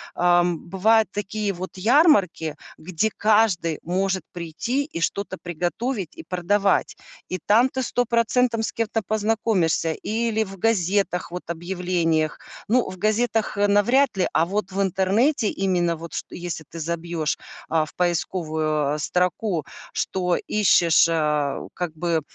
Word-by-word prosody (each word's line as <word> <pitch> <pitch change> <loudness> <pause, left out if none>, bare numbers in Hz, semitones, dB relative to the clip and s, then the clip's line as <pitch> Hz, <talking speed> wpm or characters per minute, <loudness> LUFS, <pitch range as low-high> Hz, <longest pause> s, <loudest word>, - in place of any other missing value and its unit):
ам, 175 -1 +3
бывают 220 +4 +3
такие 205 0 -2
вот 185 +1 -7
ярмарки, 200 - +3 0.2
где 185 +6 -1
каждый 210 -7 +2
может 190 +2 -1
прийти 175 - -2
и 280 - -6
что-то 190 +2 -2
приготовить 175 - -3
и - - -9
продавать. 195 +3 +1 0.3
И 185 - -3
там 235 +5 +5
ты 260 - -3
100 245 0 0
процентом 235 0 +1
с - - -2
кем-то 225 0 -1
познакомишься, 210 -7 +1
или 220 +3 -1
в 195 -2 -10
газетах, 195 -3 0
вот, 180 +1 -5
объявлениях. 170 -2 -1 0.3
Ну, 240 +3 +2
в 185 - -8
газетах, 215 +2 0
э, 205 0 +3
навряд 235 +7 +3
ли, 185 - +2
а 160 - +3
вот 195 +1 -3
в 195 +1 -1
интернете 200 - +2
именно, 180 -3 0
вот, 165 +1 -9
чт - - -4
если 175 -2 -5
ты 165 - -8
забьешь, 165 -1 -2 0.3
а, 160 -1 +2
в - - -16
поисковую, 155 -4 0
э, - - -5
строку, 180 +1 0 0.3
что 180 -2 0
ищешь, 175 -6 +4
э, 150 -3 0
как 175 -3 -4
бы 165 0 0
185 Hz, 140 wpm, -23 LUFS, 170-215 Hz, 0.3 s, там